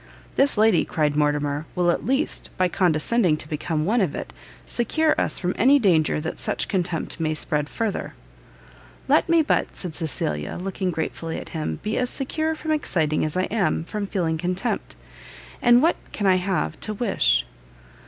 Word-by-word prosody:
"This 275 -4 +3
lady," 215 -4 +4
cried 150 -2 0
Mortimer, 145 0 0
"will 175 -1 +3
at - - -3
least, 270 +4 0
by 185 - +3
condescending 175 +1 +2
to 150 - -7
become 155 0 -2
one 225 +5 +2
of 175 -7 0
it, - - -6 0.3
secure 310 +7 +1
us - - 0
from 180 0 -1
any 270 +6 +6
danger 170 - +2
that 160 +2 -5
such - - -1
contempt 175 -5 -2
may 155 -1 0
spread 150 -1 0
further." 225 -3 -3 0.9
"Let - - +3
me 335 -1 +5
but," 295 - 0
said 175 -4 -4
Cecilia, 75 - -2
looking 190 0 -2
gratefully 165 0 -3
at - - -7
him, 155 -2 -3
"be 215 - -1
as 250 -1 0
secure 315 +4 -1
from 315 0 -4
exciting 160 - 0
as 155 +3 -2
I 185 - +2
am 195 -8 +1
from 205 +3 -4
feeling 165 -5 -1
contempt, 185 +7 -2 0.7
and 240 +2 +6
what 335 - +3
can 205 - -3
I 185 -1 +5
have 185 +1 -1
to 215 - -4
wish?" 205 -2 +2
180 Hz, 175 wpm, -24 LUFS, 155-230 Hz, 0.9 s, any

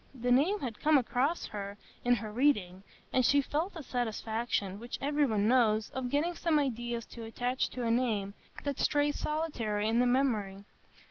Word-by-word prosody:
_—the 245 +1 -1
name 320 +12 +4
had 240 -5 -4
come 305 0 +5
across 270 +6 0
her 200 -1 -6 0.3
in 245 0 +4
her 215 -1 -5
reading, 210 -8 +1 0.3
and 255 - +3
she 285 +3 +5
felt 310 +7 -1
the 325 - -6
satisfaction, 220 -4 -2
which 240 +2 -6
every 290 +1 +1
one 215 -3 +1
knows, 220 -3 +3
of 260 -1 -3
getting 300 +6 +1
some 335 -2 +1
ideas 240 -4 -1
to 235 - -11
attach 245 +3 -1
to 250 - -5
a 230 - +1
name 220 -5 0 0.3
that 285 -2 -3
strays 290 0 +1
solitary 235 -10 -1
in 225 +2 +2
the 250 - +4
memory. 215 -7 0
245 Hz, 180 wpm, -31 LUFS, 220-285 Hz, 0.3 s, come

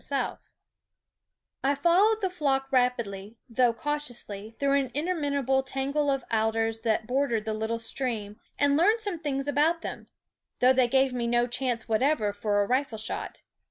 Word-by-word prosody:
SCHOOL 280 - -1
OF - - -16
g - - -42 1.2
I 280 +1 +2
followed 380 +9 +3
the 380 - +1
flock 270 -6 0
rapidly, 235 -5 0
though 245 0 +3
cau 295 +6 -2
^ 295 -1 -3
ous 240 -1 -6
^y> 210 +2 -9
through 280 0 +2
an 265 -2 -2
interminable 285 -5 0
tangle 275 +2 -1
of 270 -2 0
alders 225 0 +1
that 220 -1 0
bordered 245 -3 0
the 220 - -1
little 220 +1 -2
stream, 225 -3 -4 0.2
and 285 0 +3
learned 415 +9 +4
some 405 -6 -3
things 275 -3 -2
about 310 +4 +1
them; - - -6 0.5
though 255 +1 +5
they 255 -1 +3
gave 265 +1 +2
me 240 -1 -1
no 240 0 +2
chance 245 -1 -2
whatever 225 -2 +1
for 205 0 +1
a - - -4
rifle 255 -1 0
shot. 215 - -5
260 Hz, 180 wpm, -27 LUFS, 225-285 Hz, 1.2 s, though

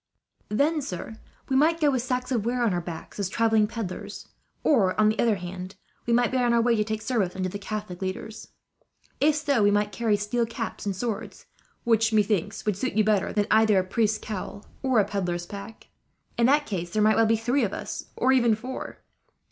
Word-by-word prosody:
"Then, 295 +8 +1
sir, 220 -2 -6 0.3
we 265 - 0
might 320 +5 +3
go 295 -3 +3
with 260 -2 0
sacks 250 +1 -2
of 235 -5 +1
ware 240 +2 0
on 220 -5 +2
our 175 - -1
backs, 170 +3 -8
as 195 -2 -1
travelling 220 0 +2
pedlars; 215 -5 -6 0.3
or, 210 -11 +3
on 215 0 +5
the 215 - -2
other 230 -3 +3
hand, 185 +1 -7 0.3
we - - +1
might 240 0 +3
be 260 - 0
on 240 -1 +2
our 235 - +4
way 235 0 +3
to 215 - +2
take 220 0 -4
service 215 -8 0
under 185 -1 -2
the 200 - -6
Catholic 205 -3 -6
leaders. 190 +3 -5 0.7
If 295 +2 +4
so, 285 -5 +1
we 205 - +5
might 205 0 +1
carry 215 0 +1
steel 230 +3 -1
caps 230 -2 -5
and 195 - -1
swords, 220 +2 -5 0.4
which 225 -1 +2
methinks 205 -2 +1
would 210 -3 0
suit 255 +5 -2
you 215 - +3
better 210 -2 +1
than 210 -1 +1
either 220 -2 +5
a 185 - +3
priest's 215 +3 +1
cowl 205 -1 -6 0.2
or 260 -3 +1
a 205 - +3
pedlar's 175 -3 -2
pack. 200 +4 -10 0.5
"In 235 0 +3
that 290 +2 +3
case 175 -4 -4
there 210 +4 +1
might 215 0 +4
well 225 -1 +4
be 225 0 +3
three 245 +5 +1
of 200 - 0
us, - - -5
or 260 - +2
even 235 -4 +4
four. 255 +4 -7
220 Hz, 215 wpm, -26 LUFS, 200-240 Hz, 0.7 s, on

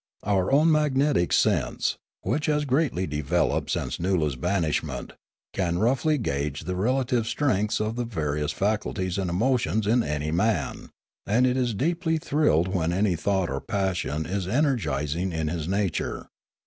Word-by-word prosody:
Our 95 -1 +1
own 155 +4 +5
magnetic 145 - +2
sense, - - +1 0.2
which 145 +5 -1
has 150 -1 +1
greatly 135 - +1
developed 75 -2 0
since - - -2
Noola' 90 -4 +1
s 70 - -5
banishment, 85 +2 -1 0.4
can 85 -3 0
roughly 135 - +2
gauge 70 - -2
the 90 +3 -4
relative 125 +3 +1
strengths 110 -7 0
of 110 +2 -2
the 120 - 0
various 75 -8 -2
faculties 100 -3 -1
and 95 -2 -1
emo 120 +9 +2
tions 110 -2 -1
in 120 +4 +3
any 75 -5 -2
man; 85 - 0 0.4
and 115 +5 +3
it 125 0 +2
is 125 -4 0
deeply 165 - 0
thrilled 115 - +2
when 90 -3 0
any 95 0 +1
thought 95 0 0
or 70 - -3
passion 90 -6 -1
is 95 0 -3
energising 95 - 0
in 80 -2 -2
his 80 -1 -3
nature. 95 -3 -1
100 Hz, 155 wpm, -26 LUFS, 85-125 Hz, 0.4 s, own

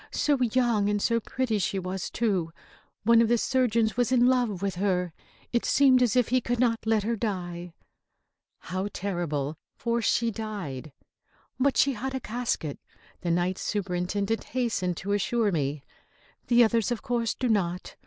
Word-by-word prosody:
"So 290 -3 +1
young 235 -4 +2
and 205 0 +1
so 230 +3 +1
pretty 230 -1 -1
she 195 +1 -1
was, 185 0 -4
too! 195 -8 0 0.5
One 230 +1 +6
of 230 - +3
the 240 +1 +3
surgeons 230 -3 +1
was 245 0 +1
in 245 -1 +4
love 245 -6 +2
with 195 -1 0
her. 180 -3 0 0.4
It 235 - +2
seemed 265 -2 +4
as 245 -2 +2
if 250 -3 +3
he 255 +1 +2
could 240 0 -2
not 235 -2 +2
let 220 -2 +2
her 230 +2 0
die." 180 -5 -4 0.9
How 185 +2 -3
terrible! 160 -6 -3 0.2
For 235 0 -1
she 230 +1 +1
died. 195 - -6 0.7
"But 275 +1 +2
she 275 - +4
had 265 +3 -4
a - - -1
casket," 230 - -3 0.4
the 175 - -2
Night 175 +2 0
Superintendent 200 +2 -2
hastened 225 -8 -1
to 200 - -4
assure 210 +1 +1
me. 145 -3 -2 0.6
"The 240 0 +6
others, 230 0 +2
of 240 -2 -3
course, 235 -2 -1
do 255 - -1
not. 180 -5 -1
215 Hz, 165 wpm, -27 LUFS, 185-240 Hz, 0.9 s, One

